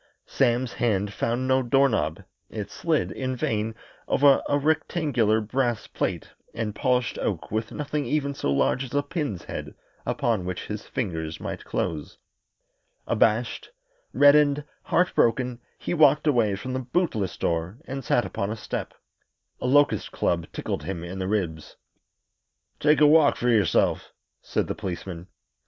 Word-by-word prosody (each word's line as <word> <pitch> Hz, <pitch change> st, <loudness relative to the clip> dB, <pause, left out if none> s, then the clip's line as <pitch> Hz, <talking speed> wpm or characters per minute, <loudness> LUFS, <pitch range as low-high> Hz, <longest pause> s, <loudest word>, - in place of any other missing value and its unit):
Sam's 125 Hz, -1 st, +1 dB
hand 105 Hz, -3 st, 0 dB
found 120 Hz, +5 st, -1 dB
no 130 Hz, 0 st, +3 dB
door 135 Hz, +3 st, +4 dB
knob 85 Hz, -, -1 dB, 0.3 s
it 105 Hz, -2 st, -6 dB
slid, 155 Hz, +2 st, 0 dB
in 130 Hz, -1 st, -3 dB
vain, 110 Hz, -2 st, -1 dB, 0.3 s
over 140 Hz, -1 st, +5 dB
a 145 Hz, -, +3 dB
rectangular 145 Hz, -7 st, +1 dB
brass 120 Hz, +1 st, -1 dB
plate -, -, -3 dB, 0.2 s
and 115 Hz, -2 st, -2 dB
polished 125 Hz, +2 st, 0 dB
oak -, -, -3 dB
with 110 Hz, 0 st, -2 dB
nothing 150 Hz, -2 st, -3 dB
even 140 Hz, +1 st, 0 dB
so 70 Hz, -, -2 dB
large 70 Hz, -, +2 dB
as 135 Hz, +1 st, -7 dB
a 145 Hz, -, +2 dB
pin's 145 Hz, -, -3 dB
head -, -, -7 dB, 0.3 s
upon 110 Hz, -6 st, 0 dB
which 90 Hz, 0 st, -4 dB
his 105 Hz, 0 st, -6 dB
fingers 80 Hz, -8 st, -3 dB
might -, -, -6 dB
close. 75 Hz, -3 st, -3 dB, 0.9 s
Abashed, 115 Hz, +2 st, +1 dB, 0.4 s
reddened, 145 Hz, 0 st, +5 dB, 0.2 s
heartbroken, 125 Hz, -8 st, +2 dB, 0.2 s
he -, -, -3 dB
walked 150 Hz, -2 st, +5 dB
away 120 Hz, -9 st, +3 dB
from 130 Hz, +6 st, -5 dB
the 130 Hz, -, -1 dB
bootless 125 Hz, -, -1 dB
door 85 Hz, +5 st, -1 dB
and 135 Hz, 0 st, -5 dB
sat 120 Hz, -, +2 dB
upon 100 Hz, -, -3 dB
a 110 Hz, -, -2 dB
step. 110 Hz, -, -5 dB, 0.6 s
A -, -, -2 dB
locust 145 Hz, +2 st, +3 dB
club 85 Hz, -1 st, 0 dB
tickled -, -, -3 dB
him 85 Hz, +2 st, -5 dB
in 90 Hz, +2 st, -6 dB
the 95 Hz, -, -2 dB
ribs. 90 Hz, -7 st, -2 dB, 1.0 s
"Take 150 Hz, 0 st, +4 dB
a -, -, +8 dB
walk 150 Hz, 0 st, +6 dB
for 125 Hz, -, 0 dB
yourself," 110 Hz, -4 st, +2 dB, 0.3 s
said -, -, -1 dB
the -, -, -3 dB
policeman. 90 Hz, -3 st, -6 dB
120 Hz, 150 wpm, -25 LUFS, 100-140 Hz, 1.0 s, a